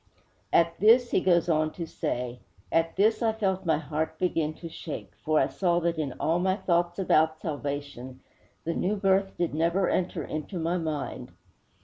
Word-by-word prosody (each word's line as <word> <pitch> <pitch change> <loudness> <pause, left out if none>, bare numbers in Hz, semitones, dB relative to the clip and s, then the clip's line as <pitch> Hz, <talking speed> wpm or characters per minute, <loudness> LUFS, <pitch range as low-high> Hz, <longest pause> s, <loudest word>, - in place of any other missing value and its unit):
_' - - -41 0.5
'At 170 0 +3
this,' 235 +4 +5
he - - +3
goes 175 -2 +3
on 155 -2 +2
to 170 - -5
say, 125 -5 -3 0.3
'at 165 0 +1
this 215 +5 +3
I 225 -1 +2
felt 190 -4 -1
my 160 -2 +3
heart 155 +1 -3
begin 165 -4 0
to 170 - -8
shake, 145 - -7
for 155 0 +3
I - - +4
saw 175 -2 +1
that 170 -1 0
in 140 -4 -2
all 165 +2 0
my 185 +1 +2
thoughts 175 -3 0
about 160 -4 +2
salvation, 140 -4 -5 0.4
the 165 - -1
new 195 +5 0
birth 195 -1 +1
did 175 -3 -1
never 170 +4 +1
enter 185 0 -1
into 155 +5 -5
my 170 +2 0
mind!' 155 -4 -4
170 Hz, 180 wpm, -27 LUFS, 155-185 Hz, 0.5 s, this